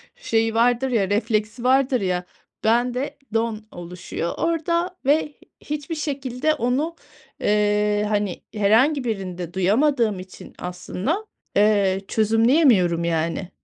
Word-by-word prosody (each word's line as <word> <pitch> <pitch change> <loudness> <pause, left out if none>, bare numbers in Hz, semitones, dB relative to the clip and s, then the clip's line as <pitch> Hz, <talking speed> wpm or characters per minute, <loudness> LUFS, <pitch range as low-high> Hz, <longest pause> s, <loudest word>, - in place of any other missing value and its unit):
şeyi 225 - 0
vardır 245 +3 +3
ya, 200 -5 +1
refleksi 215 +2 -1
vardır 260 -2 +3
ya. 180 -1 -1 0.4
Bende 245 +5 +1 0.2
don 225 -1 -1
oluşuyor 175 -1 -5
orada 335 +2 0
ve 290 +3 +5
h - - -32 0.3
hiçbir 300 +2 -4
şekilde 280 -1 -1
onu, 290 +5 -1 0.5
eee, 210 0 +2
hani, 205 -3 -1
herhangi 235 +8 +3
birinde 180 -6 -4
duyamadığım 215 +2 +2
için 185 0 -11
aslında, 185 - -3 0.3
eee, 200 -2 +3
çözümleyemiyorum, 220 - +3
yani. 170 +2 -1
225 Hz, 110 wpm, -23 LUFS, 195-270 Hz, 0.5 s, ve